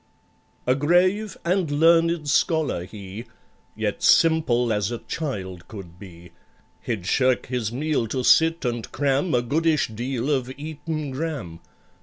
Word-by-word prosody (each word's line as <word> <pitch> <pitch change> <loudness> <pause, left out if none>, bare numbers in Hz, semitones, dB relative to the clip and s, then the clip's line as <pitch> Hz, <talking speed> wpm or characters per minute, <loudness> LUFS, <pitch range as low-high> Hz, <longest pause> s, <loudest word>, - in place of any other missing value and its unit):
A 125 - +3
grave 180 +9 +2
and 180 -2 +1
learned 165 +1 +3
scholar 150 - +1
he, 100 +3 -9 0.5
Yet - - -3
simple 125 -8 +3
as 105 -1 0
a 120 - -3
child 95 - -5
could 90 -5 -11
be. 85 -3 -13 0.5
He'd 105 -7 -4
shirk 130 +4 +2
his 120 -4 -2
meal 140 -2 -1
to 130 +3 -2
sit 165 +3 +4
and 120 -2 -3
cram 140 +3 +1
A 120 - +2
goodish 155 +3 +1
deal 125 +4 -3
of 130 -3 -1
Eton 155 0 -5
Gram. 130 - -5
135 Hz, 135 wpm, -24 LUFS, 115-160 Hz, 0.5 s, sit